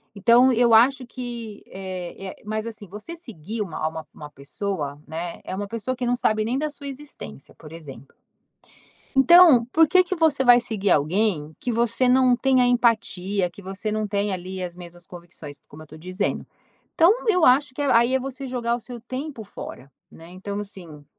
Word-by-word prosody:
Então 240 +5 +5
eu 235 0 +3
acho 255 +3 +5
que, 235 -4 -7
eh 185 -2 -7
eh - - -9
mas 215 +1 -3
assim 220 -3 -9
você 210 - -9
seguir 220 - -7
uma 170 -6 -4
uma 160 -1 -7
uma 150 -1 -10
pessoa, 145 +1 -5
né, 170 +2 -6
é - - -6
uma 200 +1 -4
pessoa 230 +4 -3
que 250 - -3
não 245 0 +1
sabe 215 -3 0
nem 240 +4 -1
da 305 +2 -1
sua 285 -1 -9
existência, 275 - -9
por 155 -2 -14
exemplo. 140 -6 -12 1.0
Então, 275 -2 +7
por 320 +6 +4
que 370 +4 +5
que 370 +1 -4
você 315 -4 +2
vai 245 -2 +7
seguir 210 -4 -2
alguém 160 0 +1
que 245 - -3
você 235 +2 +1
não 255 0 +4
tenha 260 0 +3
empatia, 205 -6 +1
que - - -14
você 195 +3 -5
não 215 0 -1
tenha 200 0 -1
ali 185 +1 -6
as 175 -1 -5
mesmas 175 -1 -12
convicções? 170 -4 -11
Como 155 +2 -12
eu - - -11
estou 155 +1 -14
dizendo. 185 +4 -3 0.5
Então, 335 +5 +6 0.2
eu 365 -6 +4
acho 255 +1 +4
que 290 - -3
aí 250 -2 +3
é 265 - +2
você 270 +1 -6
jogar 240 -2 -1
o - - -9
seu 240 0 -9
tempo 255 +1 -6
fora, 140 -8 -10 0.2
né? 165 +1 -14
Então, 195 +3 -6
assim, 175 -7 -10
215 Hz, 190 wpm, -23 LUFS, 180-255 Hz, 1.0 s, Então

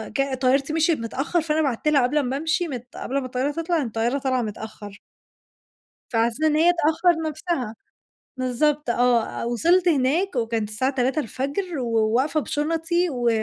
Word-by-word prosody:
ك 275 -1 0
طيارتي 275 +3 +2
مشيِت 325 -2 +2
متأخر، 270 +9 -1
فأنا 315 0 0
بعتت 275 -1 -1
لها 285 -4 +4
قبل 295 +5 +2
ما 260 +1 -2
أمشي 320 +3 0
مت 250 -4 -6
قبل 275 +3 -2
ما 265 - -5
الطيارة 255 +3 -1
تطلع، 330 +2 -1
إن 265 - -2
الطيارة 230 +4 -1
طالعة 255 -2 0
متأخر. 210 -1 -7 1.1
فعلى 230 -1 +2
اساس 240 +6 -6
إن 310 -1 +3
هي 340 +3 +5
تأخَّر 325 +1 +2
نفسها. 295 -7 -3 0.6
بالضبط، 260 +3 0
آه. 240 -1 +1
وصلْت 340 +10 +2
هناك 305 +5 +1
وكانت 225 -3 -1
الساعة 260 +6 0
3:00 260 +4 +1
الفجر 285 - -3
وواقفة 235 +5 +1
بِشُنطي 325 +4 0
و 245 -4 0
275 Hz, 160 wpm, -23 LUFS, 240-315 Hz, 1.1 s, هي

